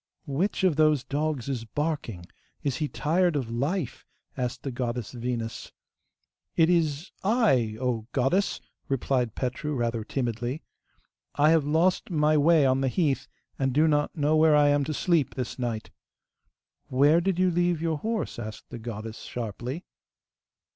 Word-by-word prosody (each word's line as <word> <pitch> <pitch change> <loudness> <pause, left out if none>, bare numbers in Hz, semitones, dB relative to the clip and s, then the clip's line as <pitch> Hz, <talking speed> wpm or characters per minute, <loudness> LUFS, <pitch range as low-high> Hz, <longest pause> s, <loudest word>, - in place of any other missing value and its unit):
'Which 165 +9 -1
of 175 -6 +3
those 155 -4 +4
dogs 145 -3 -2
is 130 -4 -2
barking? 130 - -3 0.4
Is 140 -3 -1
he 155 - -1
tired 170 +4 +1
of 125 -5 -2
life?' 140 +6 -2 0.3
asked 125 -1 -3
the 135 - -3
goddess 120 -2 -3
Venus. 120 -2 -4 0.8
'It 165 +1 +4
is 160 -1 0
I, 190 - +2
O 120 -4 -1
goddess!' 140 +10 +1 0.3
replied 130 -3 0
Petru, 140 +4 -2
rather 115 -2 -1
timidly. 120 +3 -3 0.7
'I 150 +2 +5
have 160 -3 +3
lost 165 +5 +2
my 155 -2 +3
way 155 0 +5
on 130 0 +2
the 135 - +1
heath, 140 0 0 0.3
and 135 -1 +1
do 155 +4 +4
not 150 -1 +1
know 150 +1 +2
where 155 -1 +5
I 145 -1 +5
am 145 0 +3
to 155 - -2
sleep 165 -5 +1
this 125 0 -4
night.' 115 -3 -3 1.0
'Where 145 +6 +4
did 190 0 0
you 185 0 +3
leave 175 -1 +1
your 160 -2 -1
horse?' 220 - -2
asked 110 -2 -8
the 120 - -6
goddess 110 -1 -6
sharply. 120 - -5
145 Hz, 155 wpm, -27 LUFS, 120-160 Hz, 1.0 s, I